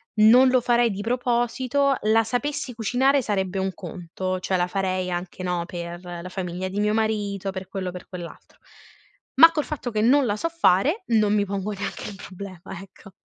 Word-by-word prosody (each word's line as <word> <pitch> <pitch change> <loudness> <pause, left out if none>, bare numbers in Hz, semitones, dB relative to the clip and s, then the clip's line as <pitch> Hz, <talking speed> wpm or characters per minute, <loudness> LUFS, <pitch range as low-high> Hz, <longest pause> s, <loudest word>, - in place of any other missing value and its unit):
non 235 +4 +7
lo 255 0 +4
farei 240 -1 +3
di 195 - -5
proposito, 250 +4 +1
la 220 +1 +3
sapessi 275 +2 -2
cucinare 260 +5 +2
sarebbe 195 -4 -2
un 190 0 -1
conto, 185 +1 -5
cioè 185 - 0
la 175 0 +1
farei 185 -1 -1
anche, 175 +1 -5
no, 180 -1 -1
per 175 0 -7
la 175 0 -7
famiglia 185 0 -4
di 195 +2 -4
mio 210 0 +1
marito, 205 -3 -1
per 190 -1 -7
quello 195 -2 -4
o - - -5
per 180 - -9
quell'altro. 175 -3 -10 0.8
Ma 325 +5 +9
col 300 -3 -1
fatto 285 -5 -4
che 215 - 0
non 265 +4 +4
la 205 -2 0
so 330 +10 -2
fare 320 - +2
non 215 -3 +3
mi 205 -1 +2
pongo 200 +1 -3
neanche 200 0 -5
il 205 - -9
problema, 190 -2 -9
ecco. 195 0 -15
205 Hz, 190 wpm, -24 LUFS, 185-240 Hz, 0.8 s, Ma